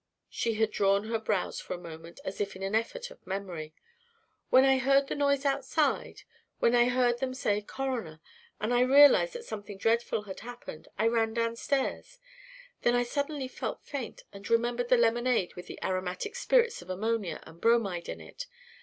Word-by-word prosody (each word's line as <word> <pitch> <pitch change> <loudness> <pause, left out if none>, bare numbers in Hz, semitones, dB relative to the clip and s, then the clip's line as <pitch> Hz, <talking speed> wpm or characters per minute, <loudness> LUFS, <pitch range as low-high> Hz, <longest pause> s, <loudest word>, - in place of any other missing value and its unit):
She 230 -1 -1
had 220 0 +1
drawn 200 0 +2
her 225 -1 0
brows 210 -3 -1
for 185 - -5
a - - -7
moment 165 -1 -10
as 190 - -4
if 200 -1 -2
in 190 - -7
an 195 +1 -2
effort 485 - -1
of - - -17
memory. 180 -5 -5 0.7
"When 260 +1 +6
I 265 -1 +4
heard 275 +2 +4
the - - -4
noise 280 -1 +1
outside 275 +2 0 0.3
when 235 - +3
I 240 0 +6
heard 245 -1 +2
them 255 0 -2
say 210 -5 0
'coroner' 230 -9 -4 0.4
and 220 +3 -1 0.2
realised 290 - +7
that 480 -1 -7
something 205 - -7
dreadful 225 +1 +1
had 195 -2 -8
happened, 240 -9 -9
I 220 - +1
ran 225 -1 +2
downstairs. 235 - -1 0.6
Then 240 - +3
I 245 - +3
suddenly 285 +2 -2
felt - - -5
faint 275 -5 -6
and 200 0 -9
remembered 240 +1 +1
the 250 - +6
lemonade 235 -3 +2
with 180 - -10
the - - -8
aromatic 185 - -2
spirits 475 - +2
of 175 - -14
ammonia 215 +1 -1
and 165 +1 -15
bromide 215 -7 +2
in 85 - -5
it. 80 - -9
230 Hz, 180 wpm, -29 LUFS, 195-260 Hz, 0.7 s, realised